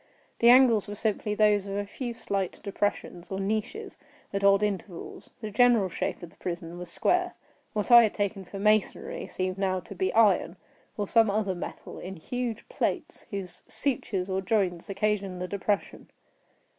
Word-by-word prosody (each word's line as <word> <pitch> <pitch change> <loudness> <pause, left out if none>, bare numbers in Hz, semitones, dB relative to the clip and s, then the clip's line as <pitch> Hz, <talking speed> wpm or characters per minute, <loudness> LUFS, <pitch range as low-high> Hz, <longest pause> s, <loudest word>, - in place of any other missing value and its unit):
The 235 - +6
angles 245 -5 +6
were 205 - -5
simply 210 0 -1
those 210 -2 +3
of 195 - -4
a 205 - -1
few 240 +3 -5
slight 195 -4 -3
depressions, 200 -3 -2
or 190 - -2
niches, 220 - -3 0.3
at 200 0 -1
odd 200 +1 +5
intervals. 195 -3 -4
The 215 -2 -5
general 230 -3 +4
shape 175 - -3
of 170 - -9
the - - -24
prison 170 -1 -5
was 180 -1 -8
square. 360 - +1 0.4
What 210 +3 -1
I 240 0 +11
had 220 -3 +2
taken 200 -1 -1
for 190 +2 -9
masonry 215 - +1
seemed 185 0 -3
now 190 -1 +1
to 190 - -10
be 185 0 0
iron, 200 -5 +4 0.4
or 205 -2 -1
some 225 0 +4
other 200 -2 0
metal, 175 - -7
in 190 +1 -7
huge 240 +6 -4
plates, - - -3
whose 195 -3 -6
sutures 220 -6 -2
or 190 0 -1
joints 190 -4 0
occasioned 195 -2 -1
the 180 - -3
depression. 200 +1 -2
200 Hz, 170 wpm, -28 LUFS, 190-220 Hz, 0.4 s, I